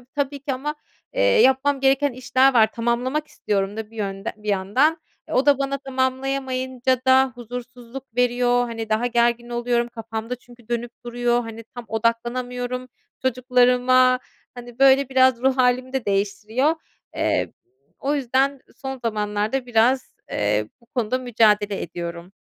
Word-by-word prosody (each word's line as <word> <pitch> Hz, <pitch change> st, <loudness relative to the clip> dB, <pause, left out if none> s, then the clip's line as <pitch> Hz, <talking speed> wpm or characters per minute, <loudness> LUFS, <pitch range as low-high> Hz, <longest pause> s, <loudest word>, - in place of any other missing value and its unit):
eee, -, -, -25 dB
tabii 285 Hz, 0 st, -1 dB
ki 275 Hz, 0 st, -3 dB
ama, 295 Hz, +4 st, -3 dB, 0.4 s
eee, -, -, -2 dB
yapmam 285 Hz, -, +4 dB
gereken 270 Hz, +1 st, +3 dB
işler 255 Hz, +2 st, +2 dB
var 220 Hz, -2 st, +5 dB
tamamlamak 245 Hz, +6 st, -1 dB
istiyorum 200 Hz, 0 st, -2 dB
da 220 Hz, -1 st, -6 dB
bir 225 Hz, -, -16 dB
yönd 195 Hz, -1 st, -4 dB
bir 210 Hz, 0 st, -10 dB
yandan. 210 Hz, -, +2 dB, 0.3 s
O 265 Hz, +3 st, +2 dB
da 285 Hz, -2 st, +5 dB
bana 275 Hz, 0 st, -1 dB
tamamlayamayınca 260 Hz, -1 st, -1 dB
da 260 Hz, 0 st, +5 dB
huzursuzluk 245 Hz, +1 st, -8 dB
veriyor, 245 Hz, 0 st, +2 dB
hani, 225 Hz, -2 st, -5 dB
daha 220 Hz, +3 st, +1 dB
gergin 240 Hz, 0 st, +1 dB
oluyorum, 240 Hz, 0 st, 0 dB
kafamda 225 Hz, 0 st, -5 dB
çünkü 240 Hz, -1 st, -19 dB
dönüp 240 Hz, 0 st, -2 dB
duruyor, 240 Hz, 0 st, 0 dB
hani, 225 Hz, 0 st, -8 dB
tam 245 Hz, -, -7 dB
odaklanamıyorum 245 Hz, +3 st, -2 dB, 0.3 s
çocuklarıma, 255 Hz, 0 st, +3 dB, 0.4 s
hani, 245 Hz, -1 st, -11 dB
böyle, 270 Hz, 0 st, +5 dB
biraz 260 Hz, -2 st, +4 dB
ruh 265 Hz, 0 st, +3 dB
hâlimi 255 Hz, 0 st, +2 dB
de 265 Hz, -3 st, -2 dB
değiştiriyor. 210 Hz, +8 st, 0 dB, 0.4 s
Eee, -, -, 0 dB, 0.5 s
o 280 Hz, +2 st, -1 dB
yüzden 275 Hz, 0 st, +1 dB, 0.2 s
son 265 Hz, -1 st, -6 dB
zamanlarda 215 Hz, +3 st, -1 dB
biraz, 245 Hz, +3 st, +2 dB
eee, 105 Hz, +1 st, 0 dB
bu 235 Hz, -, -25 dB
konuda 245 Hz, +1 st, 0 dB
mücadele 210 Hz, -5 st, +2 dB
ediyorum. 170 Hz, +1 st, -6 dB
245 Hz, 140 wpm, -23 LUFS, 230-260 Hz, 0.5 s, var